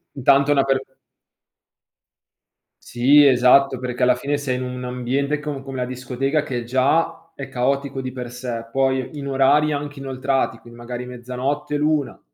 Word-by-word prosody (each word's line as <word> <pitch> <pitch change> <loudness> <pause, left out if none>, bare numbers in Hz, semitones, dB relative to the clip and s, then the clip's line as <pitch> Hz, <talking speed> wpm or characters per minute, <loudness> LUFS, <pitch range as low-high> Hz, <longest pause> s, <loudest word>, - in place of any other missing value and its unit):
intanto 140 +2 +3
è - - +5
una 135 -1 +3
per 135 -1 +1 2.0
Sì, 140 +5 +4
esatto, 130 0 +5
perché 125 -1 -3
alla 125 0 +5
fine 145 +3 -2
sei 130 -3 -2
in 130 - -4
un 125 0 -5
ambiente 130 +4 -1
com 150 -2 -5
come 135 -2 -5
a - - 0
discoteca 130 +4 -2
che 120 -2 -4
già 155 +6 0
è 135 -1 -7
caotico 135 +1 -1
di 130 0 -5
per 125 -2 -6
sé, 120 -2 -5
poi 135 +2 0
in 140 -1 -5
orari 140 +3 +3
anche 145 -1 -4
inoltrati, 135 0 -1
quindi 120 0 -15
magari 120 +1 -6
mezzanotte, 125 +4 -3
l'una 150 -1 0
135 Hz, 160 wpm, -21 LUFS, 125-140 Hz, 2.0 s, è